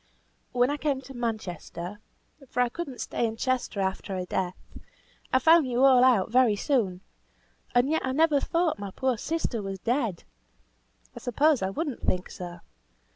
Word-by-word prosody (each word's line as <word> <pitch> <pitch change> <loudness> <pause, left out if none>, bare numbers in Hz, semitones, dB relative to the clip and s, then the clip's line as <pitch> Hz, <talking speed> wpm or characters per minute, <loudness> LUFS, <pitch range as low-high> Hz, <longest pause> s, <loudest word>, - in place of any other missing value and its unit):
"When 250 +2 +2
I 295 - -1
came 290 -3 0
to 270 - -11
Manchester 205 - -5 0.5
(for 250 - 0
I 245 - +2
could 345 +7 -5
not 255 -3 -9
stay 235 - -1
in 225 0 -5
Chester 255 -4 -1
after 190 0 -2
her 180 - -3
death), 180 0 -2 0.7
I - - +5
found 320 +1 +5
you 250 +1 +1
all 260 -2 +7
out 230 -6 +4
very 245 -3 +4
soon. 200 -7 0 0.7
And 245 +2 +4
yet 320 +2 +1
I 260 - -1
never 300 +1 +3
thought 330 - 0
my 200 -1 -5
poor 260 +6 0
sister 270 -3 -2
was 195 -1 -5
dead. 230 -3 -1 0.9
I - - -7
suppose 285 +2 +2
I 190 - 0
would 310 - -2
not 265 - -5
think 180 0 -2
so. 175 -1 -8
245 Hz, 180 wpm, -27 LUFS, 195-275 Hz, 0.9 s, all